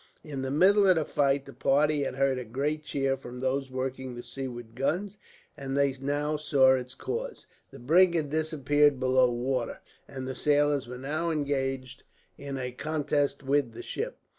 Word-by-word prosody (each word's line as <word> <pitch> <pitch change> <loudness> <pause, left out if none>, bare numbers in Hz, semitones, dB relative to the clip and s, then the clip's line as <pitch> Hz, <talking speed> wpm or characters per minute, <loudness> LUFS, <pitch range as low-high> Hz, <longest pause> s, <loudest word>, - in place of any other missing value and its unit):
In 145 -4 -5
the 135 - -2
middle 195 +8 +5
of 185 - +6
the 160 -2 0
fight, 140 -1 +1
the 140 - -11
party 145 +2 +2
had 135 - -2
heard 135 -1 +1
a - - -4
great 140 +7 -2
cheer 135 -2 0
from 125 -2 -9
those 135 +1 -1
working 130 -1 -4
the 120 - -7
seaward 120 -4 -7
guns, 190 - -2 0.4
and 135 -2 -4
they 140 -1 +3
now 145 +2 -1
saw 135 -3 +4
its 130 0 -3
cause. - - -5 0.2
The - - -12
brig 170 +8 +4
had 150 -4 -1
disappeared 150 -3 +2
below 130 0 +4
the 120 - -2
water, 125 0 -2 0.3
and 130 -2 -6
the 130 - -3
sailors 145 -2 +2
were 125 +1 -7
now 155 +6 -2
engaged 135 -4 -2 0.3
in 140 -1 -6
a 125 -1 -3
contest 145 +1 -1
with 135 -3 +1
the - - -8
ship. - - -4
140 Hz, 185 wpm, -28 LUFS, 130-150 Hz, 0.4 s, of